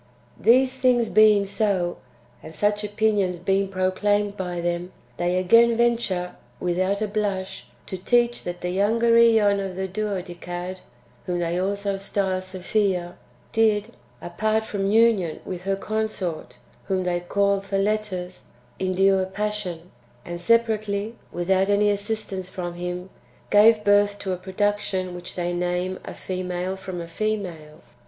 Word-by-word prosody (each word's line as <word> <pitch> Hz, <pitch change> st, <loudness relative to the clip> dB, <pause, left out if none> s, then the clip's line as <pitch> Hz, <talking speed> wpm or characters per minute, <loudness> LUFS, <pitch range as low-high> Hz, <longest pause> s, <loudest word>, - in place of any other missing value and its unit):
3. 225 Hz, -, +6 dB
These 260 Hz, +1 st, +3 dB
things 250 Hz, -3 st, +3 dB
being 215 Hz, -2 st, +5 dB
so, 195 Hz, -3 st, 0 dB, 0.4 s
and 160 Hz, 0 st, -10 dB
such 205 Hz, +3 st, +1 dB
opinions 205 Hz, -3 st, +1 dB
being 195 Hz, +2 st, +1 dB
pro 185 Hz, -1 st, 0 dB
claimed 205 Hz, +1 st, +1 dB
by 180 Hz, -3 st, -4 dB
them, 175 Hz, +1 st, -2 dB, 0.3 s
they 175 Hz, +1 st, 0 dB
again 230 Hz, +5 st, +5 dB
venture, 230 Hz, -7 st, +1 dB, 0.3 s
without 185 Hz, +4 st, 0 dB
a -, -, 0 dB
blush, 200 Hz, -2 st, -3 dB, 0.2 s
to 190 Hz, -, -6 dB
teach 240 Hz, +4 st, +2 dB
that 175 Hz, 0 st, -5 dB
the 180 Hz, -, -2 dB
younger 225 Hz, +5 st, +2 dB
^on 220 Hz, -4 st, +5 dB
of 190 Hz, -2 st, -5 dB
the 190 Hz, +1 st, -2 dB
Duodecad, 180 Hz, -2 st, -4 dB, 0.5 s
whom 180 Hz, -1 st, -1 dB
they 175 Hz, 0 st, -1 dB
also 200 Hz, +1 st, -1 dB
style 195 Hz, -1 st, -1 dB
Sophia, 185 Hz, -1 st, -1 dB, 0.4 s
did, 220 Hz, -1 st, +2 dB, 0.3 s
apart 215 Hz, +5 st, 0 dB
from 195 Hz, -2 st, -2 dB
union 215 Hz, -6 st, +3 dB
with 180 Hz, -1 st, -6 dB
her 195 Hz, 0 st, +1 dB
consort, 205 Hz, -5 st, -3 dB, 0.3 s
whom 190 Hz, -1 st, 0 dB
they 175 Hz, -1 st, 0 dB
call 200 Hz, +3 st, +1 dB
Theletus, 195 Hz, -2 st, -2 dB, 0.4 s
endure 190 Hz, 0 st, +2 dB
passion, 190 Hz, -4 st, -4 dB, 0.3 s
and 175 Hz, 0 st, -6 dB
separately, 215 Hz, -1 st, +1 dB, 0.2 s
without 190 Hz, +3 st, +1 dB
any 205 Hz, +1 st, +3 dB
assistance 200 Hz, -2 st, -3 dB
from 175 Hz, -2 st, -5 dB
him, 180 Hz, +1 st, -5 dB, 0.4 s
gave 215 Hz, +1 st, +6 dB
birth 205 Hz, 0 st, +3 dB
to 190 Hz, -2 st, -3 dB
a -, -, -3 dB
production 190 Hz, -1 st, -1 dB
which 180 Hz, 0 st, -8 dB
they 175 Hz, -1 st, -2 dB
name 180 Hz, +1 st, -1 dB
"a -, -, -8 dB
female 185 Hz, 0 st, -3 dB
from 185 Hz, -2 st, -6 dB
a 170 Hz, -, -7 dB
female." 170 Hz, -6 st, -4 dB
195 Hz, 140 wpm, -24 LUFS, 180-210 Hz, 0.5 s, 3